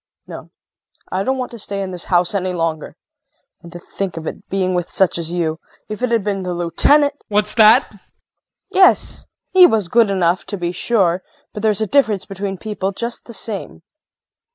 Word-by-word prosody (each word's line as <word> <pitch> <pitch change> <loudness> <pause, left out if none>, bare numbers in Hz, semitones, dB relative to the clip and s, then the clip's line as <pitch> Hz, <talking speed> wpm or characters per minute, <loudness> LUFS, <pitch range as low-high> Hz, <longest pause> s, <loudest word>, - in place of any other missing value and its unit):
No, - - -10 0.6
I 185 - -1
don't 265 +6 -1
want 255 -1 -4
to 235 - -9
stay 200 -1 -3
in 190 - -5
this 180 -1 -5
house 175 +1 +1
any 185 -2 -1
longer! 165 -3 -3 0.7
And 170 - -13
to 175 - -8
think 180 0 -6
of 160 - -6
it - - -7
being 185 -1 0
with 175 -1 -2
such 190 -2 +1
as 165 0 -4
you! 165 -2 -2 0.3
If 215 +2 -6
it 250 - 0
had 230 -3 +1
been 200 -1 -2
the 180 -1 -3
Lieutenant 285 - +3
JEAN. 290 - -42
What's 210 0 0
that? 225 +3 +6
KRISTIN. 205 - -21 0.7
Yes! 375 0 +3 0.2
He 370 -1 +8
was 215 - 0
good 230 0 +4
enough, 180 -2 +1
to 205 - -4
be 175 -1 -2
sure, 185 -2 +1 0.3
but 210 - -6
there's 215 -1 +1
a - - +2
difference 215 -6 +1
between 195 0 -5
people 200 -1 -3
just 235 +4 -5
the 235 - -11
same. 205 -6 -6
195 Hz, 200 wpm, -18 LUFS, 175-220 Hz, 0.7 s, He